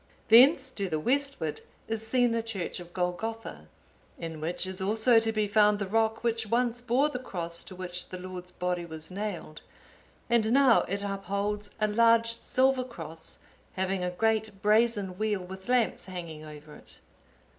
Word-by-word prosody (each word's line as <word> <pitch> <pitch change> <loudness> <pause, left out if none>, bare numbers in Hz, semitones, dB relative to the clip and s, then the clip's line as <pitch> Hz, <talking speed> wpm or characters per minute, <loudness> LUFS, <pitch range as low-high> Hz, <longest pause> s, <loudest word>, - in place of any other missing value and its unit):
Thence, 260 +4 +7
to 200 -6 -3
the 155 - -1
westward, 270 - -1 0.3
is 225 0 -3
seen 245 0 +3
the 230 0 0
church 220 -7 -4
of 175 -1 -11
Golgotha, 185 +6 -4 0.5
in 160 -2 -6
which 170 +3 -2
is 190 0 -5
also 220 +4 +4
to 225 0 0
be 215 -1 0
found 210 0 +4
the 205 - -2
rock 225 +3 0
which 230 -1 0
once 240 +1 0
bore 250 +4 +2
the 250 - -4
Cross 170 -8 -4
to 185 - -8
which 180 -1 -6
the 185 - -6
Lord's 180 0 -8
body 180 -1 -2
was 160 0 -7
nailed, 190 -6 -5 0.7
and 230 -2 +2
now 265 -3 +6
it 200 +2 -2
upholds 200 +1 -2
a 215 - +2
large 230 +1 +4
silver 260 +2 +2
cross, 165 -10 -8 0.4
having 190 0 -1
a 180 - 0
great 215 +1 -1
brazen 210 -3 +2
wheel 215 -3 0
with 190 +3 -10
lamps 250 -3 +1
hanging 170 -5 -7
over 150 0 -11
it. - - -15
210 Hz, 165 wpm, -29 LUFS, 180-230 Hz, 0.7 s, Thence